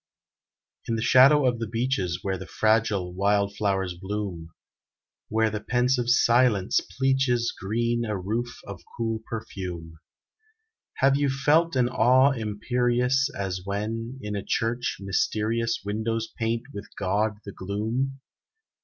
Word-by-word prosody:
In 115 - 0
the 110 - -2
shadow 135 +3 +6
of 120 -2 +1
the 115 - -3
beeches, 110 -7 -1
Where 95 -1 -2
the 95 - -8
fragile 110 -5 +1
wildflowers 100 -1 0
bloom; 95 -3 -5 0.8
Where 110 0 +1
the 105 - -3
pensive 125 +2 +1
silence 120 -5 +3 0.2
pleaches 130 -3 +2
Green 115 +4 -1
a 105 -2 -2
roof 115 +6 -2
of 100 -1 -8 0.2
cool 115 -1 -1
perfume, 90 -7 -6 1.0
Have 135 +1 +3
you 145 -1 +1
felt 150 +4 +2
an 125 -2 +3
awe 130 +3 +4
imperious 125 +3 0
As 95 -2 -3
when, 110 +5 -4
in 105 0 -4
a 100 - -3
church, 120 +1 -1
mysterious 110 +4 -1
Windows 110 +2 -2
paint 115 0 -1
with 100 0 -7
God 105 +2 0
the 100 - -6
gloom? 115 +9 -3
110 Hz, 125 wpm, -26 LUFS, 100-125 Hz, 1.0 s, shadow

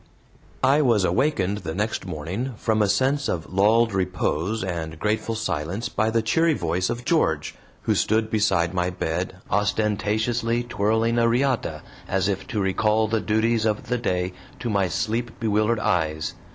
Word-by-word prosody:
I 140 +3 +5
was 115 -8 +3
awakened 105 -8 +1
the 80 -4 -5
next 105 0 -2
morning 95 - -4
from 110 0 +1
a 105 - +2
sense 135 +6 +1
of 85 +1 -3
lulled 110 +3 +4
repose 95 +2 -1
and 80 -4 -4
grateful 110 +5 -1
silence 100 0 -2
by 110 +1 0
the 115 0 +1
cheery 160 +8 +2
voice 90 -1 -1
of 120 0 -4
George, 80 - +1 0.3
who - - +2
stood 110 +1 +1
beside 90 -5 +2
my 90 0 0
bed, 90 +1 -3 0.2
ostentatiously 110 +3 0
twirling 115 +1 +1
a 115 - +4
riata, 120 - 0 0.2
as 95 -1 +1
if 95 -1 -2
to 105 - -2
recall 105 +3 +2
the 110 0 0
duties 110 +1 +1
of 105 -1 -1
the 125 - +1
day 90 -5 -1 0.3
to 120 - -2
my 100 -2 +2
sleep 115 +6 -2
bewildered 110 +1 +1
eyes. 80 -6 0
105 Hz, 160 wpm, -24 LUFS, 90-115 Hz, 0.3 s, I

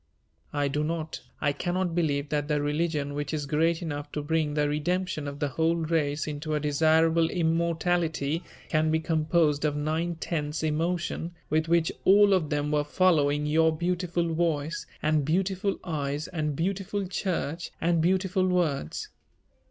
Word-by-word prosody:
I 145 -1 0
do 145 +2 -1
not, 160 0 -3 0.2
I 145 - +2
cannot 175 +3 -1
believe 145 -4 0
that 145 -1 -1
the 150 -1 +1
religion 145 -1 -1
which 145 +1 -3
is 145 -2 -3
great 165 +4 +1
enough 145 -2 -5
to 150 - -2
bring 155 -1 0
the 150 -1 +2
redemption 155 +1 -1
of 140 0 -5
the 145 -1 -1
whole 160 +4 +1
race 155 -2 0
into 155 +1 -3
a - - +1
desirable 160 +2 +3
immortality 165 -2 0 0.3
can 155 0 +2
be 160 0 +2
composed 160 -2 +1
of 150 -1 +1
nine 160 +3 -1
tenths 155 -2 -3
emotion, 170 +2 -1 0.2
with 160 +1 +2
which 170 -1 +2
all 200 +1 +6
of 170 -6 +1
them 150 0 -1
were 150 -1 +2
following 150 -3 +2
your 160 +2 +3
beautiful 175 -1 -1
voice 160 -2 -1 0.2
and 155 -1 +2
beautiful 190 +5 0
eyes 150 -3 -2
and 155 -5 -2
beautiful 195 +4 -2
church 175 -3 -2
and 170 0 +2
beautiful 185 +1 +2
words. 160 - -1
160 Hz, 155 wpm, -27 LUFS, 150-170 Hz, 0.3 s, all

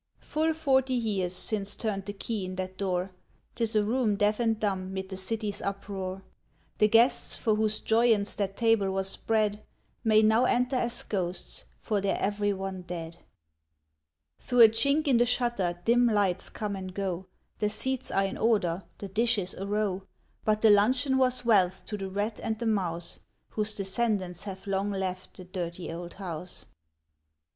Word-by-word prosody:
Full 315 +1 -1
forty 265 -4 +2
years 200 -6 -1
since 200 +1 -3
turned 200 -3 -3
the 205 - -3
key 210 0 -3
in 185 0 -5
that 185 0 -4
door. 185 -1 -1 0.4
'T 235 - -2
is 220 0 0
a 210 - +4
room 225 -1 +1
deaf 210 +2 +1
and 225 -2 +1
dumb 190 -3 -1
mid 190 0 -5
the 190 - -5
city's 205 +2 -3
uproar. 195 -1 -4 0.6
The 210 - +6
guests, 235 +3 +3
for 220 - +1
whose 215 0 +1
joyance 225 -2 +2
that 195 -2 -2
table 225 -4 +3
was 190 0 0
spread, 215 -1 0 0.4
May 220 -1 +5
now 220 +3 +4
enter 250 +1 +1
as 240 -1 -1
ghosts, 185 -3 -3
for 210 -3 -1
they're 195 0 0
every 205 +1 0
one 190 -1 -4
dead. 170 -2 -6 1.2
Through 245 -1 +2
a 225 - +11
chink 280 +7 +2
in 260 -4 +5
the 240 - +4
shutter 235 -8 0
dim 240 +1 +4
lights 200 -5 +1
come 210 -2 -4
and 185 -1 -7
go; 190 -2 -3 0.3
The 210 - +1
seats 260 +5 -2
are 195 - +2
in 195 - -4
order, 195 -6 +1
the 200 - -6
dishes 210 -2 +1
a 195 - -6
row: 205 -2 0 0.4
But 215 0 +1
the 220 - +7
luncheon 255 +6 +4
was 255 -1 +3
wealth 190 -5 +3
to 215 - -4
the 195 0 -4
rat 205 +3 -2
and 220 - -2
the 235 - -4
mouse 175 -6 -1 0.3
Whose 215 0 0
descendants 195 -3 -1
have 190 -2 -7
long 195 0 0
left 190 -2 -4
the 185 - -8
Dirty 175 -2 -5
Old 175 +1 -7
House. 180 -2 -6
205 Hz, 175 wpm, -28 LUFS, 190-225 Hz, 1.2 s, a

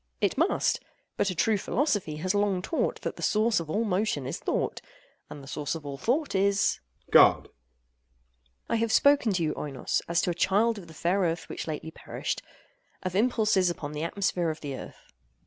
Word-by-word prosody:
It - - +1
must: - - +2 0.4
but 200 - +1
a 185 - -3
true 215 +4 +2
philosophy 205 - 0
has 180 +5 -1
long 205 -3 +1
taught 325 - -1
that - - -4
the - - -8
source 215 0 +2
of 165 -2 -6
all 210 +8 +1
motion 195 - 0
is 130 - -4
thought—and 145 - -5
the - - -12
source 150 +3 -3
of 160 -2 -8
all 140 -1 -6
thought 280 - 0
is— 200 +1 +2
OINOS. - - -33
God. - - +8
AGATHOS. - - -20 1.2
I - - +1
have 225 0 0
spoken 280 -3 +4
to 175 -2 0
you, 155 -1 0
Oinos, 140 -3 -2
as 170 0 +1
to 180 - +1
a - - -1
child 205 +6 +2
of 175 - -12
the 160 - -13
fair 180 +5 +1
Earth 170 -3 -1
which - - -5
lately 160 +1 -5
perished—of 185 - -7
impulses 215 -4 +3
upon 150 -4 -5
the 150 0 -5
atmosphere 175 0 0
of 155 - -5
the 140 -2 -4
Earth. - - -11
185 Hz, 195 wpm, -28 LUFS, 160-215 Hz, 1.2 s, God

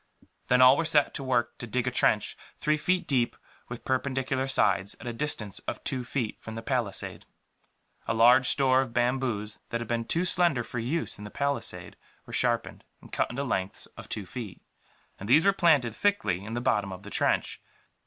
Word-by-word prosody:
Then 125 +1 +5
all 130 +2 +8
were 165 - +1
set 155 -3 +3
to - - -4
work 120 -2 0
to 120 - -6
dig 125 +2 -1
a 125 - 0
trench, 110 -3 +2 0.2
three 150 - +1
feet 180 +4 0
deep 125 -4 +1 0.3
with 120 -1 -8
perpendicular 130 0 -1
sides, 100 -6 +2
at - - -11
a 120 - -3
distance 115 -7 -2
of - - -4
two 130 -2 -2
feet 120 -3 -3
from 110 - -8
the 115 - -6
palisade. 120 -8 -2 0.8
A - - 0
large 125 +3 +6
store 130 -2 +4
of 125 -3 -6
bamboos 120 -4 -1
that 115 - -2
had 120 - -5
been 115 -1 -1
too 170 +9 0
slender 170 -9 +3
for 120 - -5
use 135 +2 -2
in - - -8
the 105 - -7
palisade 140 +5 -3 0.3
were - - -11
sharpened, - - -1 0.2
and - - -16
cut - - 0
into 135 +3 -3
lengths 95 -8 -2
of - - -11
two 105 - -4
feet; 105 -3 -8 0.6
and 100 - -7
these 150 +6 +5
were 200 - +5
planted, 150 - +3
thickly, 200 - 0
in 110 +2 -5
the 120 - -2
bottom 105 -6 0
of 95 +1 -9
the 100 - -10
trench. - - 0
125 Hz, 200 wpm, -28 LUFS, 115-140 Hz, 0.8 s, all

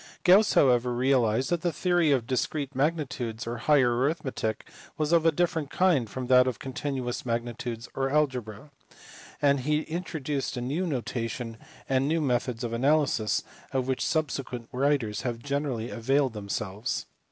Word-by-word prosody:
Gauss 195 +4 +6
however 125 -2 +4
realized 125 0 +2
that 175 -2 +1
the 175 - 0
theory 175 -3 +2
of 130 -5 +2
discrete 135 +3 -2
magnitudes 130 -5 -1
or 120 +1 -4
higher 125 -1 +3
arithmetic 130 -4 -1 0.3
was 155 0 0
of 165 -1 +4
a - - +6
different 165 -2 0
kind 160 - +2
from 130 +4 -5
that 125 0 +5
of 125 - -1
continuous 130 -2 -4
magnitudes 120 0 -3
or 135 0 -1
algebra, 130 -3 -1 0.7
and 140 -1 +4
he 150 +4 +1
introduced 155 -6 -3
a - - -2
new 150 +9 -1
notation 115 -4 -3 0.3
and 135 +1 +1
new 165 +2 +1
methods 125 -4 -1
of 115 -1 -3
analysis 130 -4 +2 0.3
of 130 -1 0
which 130 -1 0
subsequent 135 -6 -2
writers 125 -6 0
have 120 -2 -2
generally 140 -3 -3
availed 135 +2 +1
themselves. 105 +1 -3
130 Hz, 150 wpm, -27 LUFS, 120-150 Hz, 0.7 s, Gauss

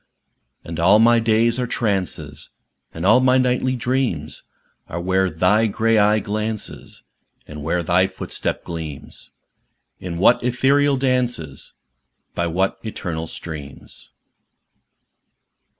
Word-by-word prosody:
And 80 0 -7
all 95 +5 +5
my 115 +1 +5
days 115 +2 +2
are 125 - -1
trances, 90 - -2 0.4
And 80 +2 -5
all 110 +5 +6
my 130 0 +4
nightly 130 0 +1
dreams 125 - -2 0.5
Are 85 - -4
where 95 +1 +1
thy 90 +7 +2
dark 100 - -8 0.2
eye 105 0 +4
glances, 110 +1 -4 0.4
And 75 0 -9
where 85 +4 -1
thy 90 +3 +3
footstep 95 0 -4
gleamsâ 80 -4 -8 0.7
In 85 -2 -6
what 120 +8 +4
ethereal 135 +3 +2
dances, 125 - -2 0.6
By 85 - -1
what 95 +3 -1
eternal 85 -7 -5
streams. 75 -4 -9
100 Hz, 115 wpm, -21 LUFS, 85-120 Hz, 0.7 s, all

